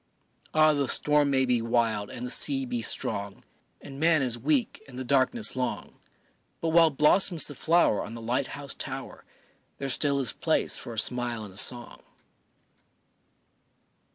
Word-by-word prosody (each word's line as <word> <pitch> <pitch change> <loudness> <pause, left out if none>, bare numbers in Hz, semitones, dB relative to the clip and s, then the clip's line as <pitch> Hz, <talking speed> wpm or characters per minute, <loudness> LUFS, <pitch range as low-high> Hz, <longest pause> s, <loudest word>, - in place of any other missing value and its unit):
Ah, 155 0 +4
the 140 -2 -1
storm 150 +1 +2
may 130 -1 +2
be 125 -2 +1
wild 115 -3 -1
and 120 - -7
the 125 - -3
sea 135 -2 +2
be 120 -2 -4
strong, 100 -2 -1 0.4
And 135 -1 -11
man 160 -2 +3
is 125 -3 -1
weak 135 +2 -1
and 125 -2 -12
the 130 - -4
darkness 140 - +1
long, 125 -1 -5 0.6
But 165 - -2
while 165 0 +5
blossoms 155 +4 +3
the 145 - -7
flower 160 -6 +1
on 115 - -9
the - - -8
light 125 +4 -2
house 140 -1 -1
tower - - -8 0.5
There 140 - -5
still 140 +2 0
is 130 - +1
place - - +1
for 120 - -5
a - - -14
smile 120 0 0
and 95 - -13
a - - -18
song. 120 +2 0
130 Hz, 165 wpm, -26 LUFS, 120-150 Hz, 0.6 s, while